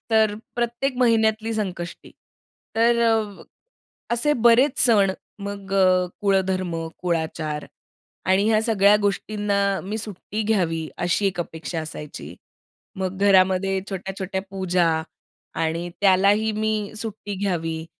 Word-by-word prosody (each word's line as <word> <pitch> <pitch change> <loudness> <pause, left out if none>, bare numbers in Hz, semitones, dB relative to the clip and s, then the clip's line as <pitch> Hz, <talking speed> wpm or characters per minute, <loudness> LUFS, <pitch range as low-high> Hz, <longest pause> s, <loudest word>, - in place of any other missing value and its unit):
तर 220 -2 +3 0.2
प्रत्येक 240 +3 -1
महिन्यातली 225 -2 +2
संकष्टी 185 -5 -5 0.6
तर 235 +1 +3
अ, 220 -3 +1 0.7
असे 270 +6 +2
बरेच 245 +4 +5
सण, 210 -6 +5 0.3
मग 200 -1 -7
अ, 185 -1 +4
कुळधर्म, 190 -3 +1 0.3
कुळाचार 160 -3 -2 0.6
आणि 190 +3 +3
ह्या 215 -1 +4
सगळ्या 210 -3 +4
गोष्टींना 200 -1 0
मी 210 +3 -4
सुट्टी 210 0 -5
घ्यावी, 170 -7 0
अशी 175 +3 +1
एक 195 -2 -1
अपेक्षा 165 0 -5
असायची. 150 -1 -8 0.6
मग 190 0 -3
घरामध्ये 190 -1 +3
छोट्या-छोट्या 190 0 -4
पूजा 185 -2 +1 0.8
आणि 165 +2 -1
त्यालाही 200 +3 +4
मी 215 -1 -1
सुट्टी 215 -2 -5
घ्यावी, 165 -5 -2
200 Hz, 110 wpm, -23 LUFS, 185-220 Hz, 0.8 s, बरेच